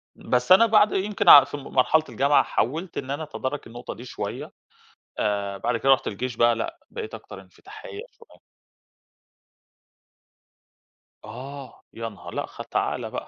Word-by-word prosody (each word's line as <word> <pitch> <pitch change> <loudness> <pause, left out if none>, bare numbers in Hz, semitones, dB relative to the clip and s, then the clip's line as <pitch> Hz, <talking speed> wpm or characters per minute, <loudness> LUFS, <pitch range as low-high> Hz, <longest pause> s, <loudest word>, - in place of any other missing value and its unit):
بس 125 +3 -1
أنا 190 +5 +8
بعد 215 -1 +4
يمكن 200 +2 +1
ع 140 - +11
في 145 +2 -7
مرحلة 140 +3 +1
الجامعة 140 +5 +3
حاولت 160 +9 -2
إن 135 0 -4
أنا 145 +3 -3
أتدارك 145 -2 -5
النقطة 120 +2 -8
دي 120 - -11
شوية، - - -6 0.7
آآ، 100 -1 -1
بعد 120 +3 -1
كده 115 +4 -2
رُحت 135 - +2
الجيش 120 +3 -4
بقى، 120 +1 +4
لأ، 330 - -4
بقيت 450 -2 -7
أكتر - - -10
انفتاحية 440 -5 -12 0.2
شوية. 460 - -20 2.8
آه، 130 +5 -10
يا 115 0 -5
نهار! 100 -4 -12
لأ، - - -2
خ - - -11
تعالَ - - -2
بقى، - - -6
135 Hz, 150 wpm, -24 LUFS, 120-165 Hz, 2.8 s, ع